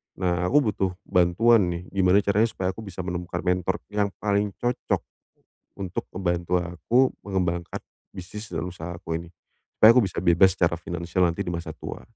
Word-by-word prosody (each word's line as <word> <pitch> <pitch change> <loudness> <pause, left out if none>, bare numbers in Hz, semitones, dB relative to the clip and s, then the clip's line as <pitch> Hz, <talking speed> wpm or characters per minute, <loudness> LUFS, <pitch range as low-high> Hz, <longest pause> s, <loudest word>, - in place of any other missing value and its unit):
Nah, 90 -1 0
aku 135 -2 +3
butuh 95 -2 -1
bantuan 95 +4 +4
nih, 85 0 -3
gimana 95 +1 +3
caranya 105 +3 +3
supaya 95 -4 -2
aku 95 - -13
bisa 95 -4 -6
menemukan 90 0 -4
mentor 90 0 +1 0.2
yang 105 -1 +1 0.2
paling 100 -1 0
cocok 120 0 -1 0.8
untuk 95 -2 -3
membantu 90 -1 0
aku 100 +9 +1
mengembangkan 90 -3 -2 0.3
bisnis 105 +4 -9
dan 90 - -3
usaha 90 -1 -7
aku 80 -2 -4
ini 85 - -13 0.5
supaya 110 +2 +8
aku 125 - +7
bisa 95 - -5
bebas 85 +1 +5
secara 85 -1 +3
finansial 85 +1 -3
nanti 85 -1 0
di - - -3
masa 85 -2 -4
tua. 75 - -8
90 Hz, 170 wpm, -25 LUFS, 85-100 Hz, 0.8 s, supaya